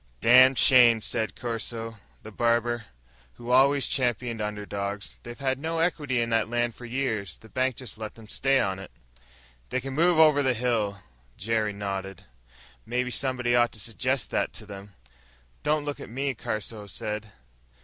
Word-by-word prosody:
"Dam' 130 - +7
shame," 120 -3 +7
said 110 -2 -2
Caruso, 115 -1 -4 0.2
the 110 - -9
barber, 120 +1 +1 0.5
who 120 - -7
always 135 +2 +5
championed 120 -3 -1
underdogs. 100 -1 -4
"They've 120 0 -9
had 130 -1 -1
no 165 +3 -3
equity 150 -6 0
in 115 0 -1
that 115 0 +1
land 120 0 0
for 120 - -11
years. 115 -8 -2
The 110 - -17
bank 130 +1 0
just 120 -4 -9
let 110 -1 -6
them 115 -2 -14
stay 135 +4 +2
on." 95 0 -2 0.8
"They 130 - 0
can 135 +1 -6
move 170 +3 +3
on 160 - +10
over 145 -2 +4
the 130 -3 +1
hill." 110 -5 -1 0.3
Jerry 110 0 0
nodded. 95 -2 -5 0.6
"Maybe 125 +1 -2
somebody 125 -2 +1
ought 120 0 +4
to 110 - -5
suggest 125 +3 -2
that - - 0
to - - -9
them." 100 -1 -11 0.7
"Don't 150 -1 0
look 145 -1 -4
at - - -9
me," 135 +3 -2
Caruso 110 -2 -5
said. 105 +1 -4
120 Hz, 165 wpm, -27 LUFS, 110-130 Hz, 0.8 s, on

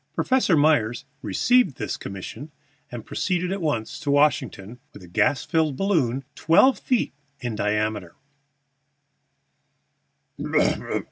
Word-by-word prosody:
Professor 255 -10 +2
Myers 135 -7 +2 0.2
received 245 - +2
this 105 - -3
commission, 100 +10 -8 0.4
and 120 -2 -7
proceeded 180 -1 -1
at 195 0 -3
once 120 -9 -2
to 145 - -4
Washington 130 -6 +1
with - - -12
a - - -12
gas 100 +9 +1
balloon 155 - 0
twelve 255 +12 +4
feet 250 -3 0 0.3
in 120 -2 -4
diameter. 105 -3 -1
135 Hz, 105 wpm, -24 LUFS, 110-165 Hz, 0.4 s, twelve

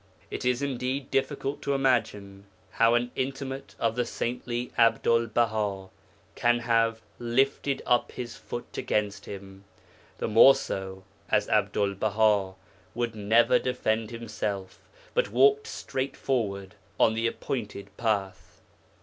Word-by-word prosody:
It - - -4
is 125 +2 +1
indeed 130 0 -2
difficult 140 +1 -1
to 140 - 0
imagine 105 -7 0 0.2
how 115 +1 +4
an 120 0 0
intimate 135 0 -4
of 115 -1 0
the 125 - +1
saintly 120 +1 -3
Abdul 115 0 +3
Baha 105 -4 -1 0.4
can 120 0 +2
have 115 -1 +1 0.2
'lifted 135 +3 0
up 120 - +2
his 120 -2 -6
foot' 120 - -7
against 105 -1 -1
him, 95 -1 -9 0.5
the - - -2
more 115 +5 +8
so 95 0 -5 0.3
as - - +2
Abdul 100 -1 +1
Baha 105 -1 +2 0.4
would 120 -1 -1
never 110 +2 +3
defend 115 -3 -1
himself, 105 -5 -5 0.3
but - - +1
walked 140 +5 +4
straight 135 +1 -4
forward 100 -7 -2 0.3
on 110 - +5
the 115 +1 0
appointed 105 -5 -5
path. 105 -5 -2
115 Hz, 125 wpm, -27 LUFS, 105-125 Hz, 0.5 s, more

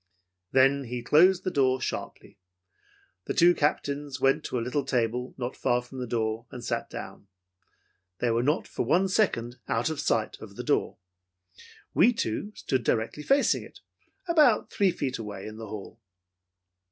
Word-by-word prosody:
"Then 135 +1 +4
he 120 0 -5
closed 175 +8 +5
the 185 - -1
door 130 -3 +2
sharply. 100 - -6 0.9
The - - -3
two 175 +1 +6
Captains 145 -3 -1
went 135 +1 +2
to - - -2
a - - -1
little 125 +5 -1
table 125 -1 -1
not 125 0 -4
far 125 -1 +1
from 130 +1 -10
the 125 - -4
door, 115 0 -2
and 125 - -9
sat - - -2
down. 100 - -8 0.9
They 120 +3 0
were 115 +1 +2
not 145 +5 0
for - - -3
one 175 +10 +3
second 125 - 0
out 120 +7 0
of 155 - -4
sight - - 0
of - - -10
the - - -5
door. - - 0 1.0
"We 245 - +5
two 205 - -3
stood 130 -3 -1
directly 115 +6 -1
facing 275 - +3
it - - -14 0.5
about 305 -10 +4
three 200 -2 +3
feet 135 -7 -3
away 105 -3 -6
in 110 0 -8
the 110 -1 -7
hall. 110 +2 -9
130 Hz, 165 wpm, -27 LUFS, 115-150 Hz, 1.0 s, two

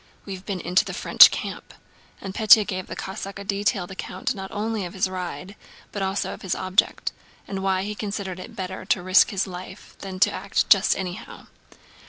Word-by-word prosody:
We've 190 -2 -7
been 195 -2 -4
into 180 +2 +2
the - - -6
French - - +8
camp." - - -6 0.5
And 195 -1 -6
Pétya 215 0 +6
gave 185 -1 -4
the - - -6
Cossack 195 0 -6
a 200 - -7
detailed 200 -2 -1
account 190 +3 -4
not 190 -3 -7
only 215 0 -2
of 175 +1 -7
his 190 - +1
ride 185 +1 -6 0.4
but 205 - -5
also 195 +1 -1
of - - -11
his 190 - -2
object, 185 +1 0 0.4
and 195 -1 -4
why 190 -1 +1
he 210 +1 -4
considered 200 -3 -5
it 185 - -10
better 190 -1 -5
to 185 -1 0
risk 185 +1 +5
his 195 -2 -1
life 185 +1 -10
than 190 -1 -7
to - - +5
act 195 +2 -1
"just 195 0 +5
anyhow." 180 -2 -7
190 Hz, 195 wpm, -24 LUFS, 185-200 Hz, 0.5 s, French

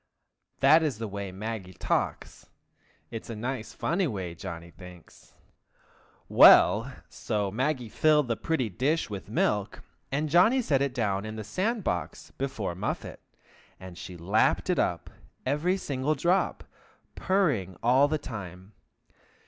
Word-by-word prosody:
that 150 +4 +6
is 150 -8 -1
the 115 0 -4
way 100 -1 -5
Maggie 95 -2 -6
talks; - - -3 0.6
it 115 - -5
is - - -16
a 115 - -5
nice, 120 +1 -4
funny 175 +3 -1
way, 95 - -4
Johnny 85 -1 -8
thinks. 90 -2 -15 0.9
Well! 115 +6 +7 0.2
so 105 -3 -3
Maggie 130 +2 -1
filled 150 +4 +3
the 115 - 0
pretty 135 -2 -1
dish 130 - -1
with 100 0 -7
milk, 105 -2 -1 0.3
and 150 +3 0
Johnny 180 - +4
set 140 -9 +1
it 140 -2 -1
down 100 -5 0
in 110 0 -6
the 110 - -5
sand 200 - -2
box 90 - -4
before 130 -9 -4
Muffet, 95 +5 -5 0.6
and 95 -1 -10
she 90 +1 -9
lapped 95 +6 +1
it - - 0
up, - - -1 0.3
every 150 +8 +1
single 145 -3 -1
drop, 175 +7 0 0.5
purring 140 - 0
all 130 +4 +5
the 155 +1 0
time. 100 - -9
115 Hz, 140 wpm, -28 LUFS, 100-150 Hz, 0.9 s, Well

